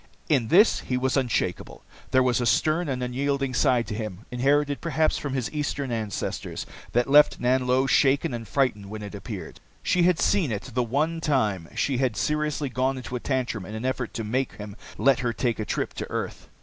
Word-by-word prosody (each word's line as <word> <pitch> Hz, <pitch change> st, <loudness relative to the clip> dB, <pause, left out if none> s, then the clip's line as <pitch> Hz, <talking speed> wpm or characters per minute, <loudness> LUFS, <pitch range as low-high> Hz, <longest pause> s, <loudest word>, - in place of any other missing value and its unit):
In 135 Hz, -7 st, +2 dB
this 200 Hz, -, +5 dB
he 125 Hz, -, -2 dB
was 130 Hz, +1 st, 0 dB
unshakeable. 120 Hz, -9 st, -1 dB, 0.3 s
There 130 Hz, 0 st, +4 dB
was 125 Hz, -1 st, +2 dB
a 120 Hz, -, +1 dB
stern 155 Hz, -, +2 dB
and 130 Hz, -2 st, -2 dB
unyielding 135 Hz, +1 st, -1 dB
side 125 Hz, -2 st, +3 dB
to -, -, -5 dB
him, 105 Hz, -2 st, -5 dB
inherited 140 Hz, +3 st, +1 dB
perhaps 160 Hz, -1 st, +1 dB
from 140 Hz, -2 st, -4 dB
his 130 Hz, 0 st, -2 dB
Eastern 145 Hz, -3 st, -2 dB
ancestors, 110 Hz, -3 st, -3 dB, 0.3 s
that 120 Hz, +1 st, +2 dB
left 145 Hz, +2 st, +6 dB
Nanlo 130 Hz, +1 st, +2 dB
shaken 135 Hz, -1 st, +3 dB
and 115 Hz, -2 st, -5 dB
frightened 110 Hz, -8 st, 0 dB
when 105 Hz, 0 st, -6 dB
it 105 Hz, -, -7 dB
appeared. 100 Hz, -1 st, -7 dB, 0.2 s
She 180 Hz, -, +2 dB
had 175 Hz, -1 st, +4 dB
seen 185 Hz, -10 st, +2 dB
it 105 Hz, -1 st, -3 dB
the 125 Hz, -, +1 dB
one 150 Hz, +8 st, 0 dB
time 105 Hz, -, 0 dB
she 135 Hz, -3 st, 0 dB
had 125 Hz, -4 st, 0 dB
seriously 150 Hz, -1 st, 0 dB
gone 130 Hz, +1 st, 0 dB
into 125 Hz, 0 st, -6 dB
a -, -, -2 dB
tantrum 125 Hz, -6 st, -2 dB
in 105 Hz, +4 st, -7 dB
an 110 Hz, +3 st, -4 dB
effort 130 Hz, -2 st, -2 dB
to 115 Hz, -, -2 dB
make 125 Hz, +5 st, -1 dB
him 105 Hz, -1 st, -8 dB, 0.2 s
let 135 Hz, -1 st, +4 dB
her 120 Hz, -3 st, -1 dB
take 120 Hz, -1 st, -1 dB
a 110 Hz, -, -2 dB
trip -, -, -2 dB
to -, -, -6 dB
earth. -, -, -5 dB
130 Hz, 200 wpm, -25 LUFS, 115-140 Hz, 0.3 s, left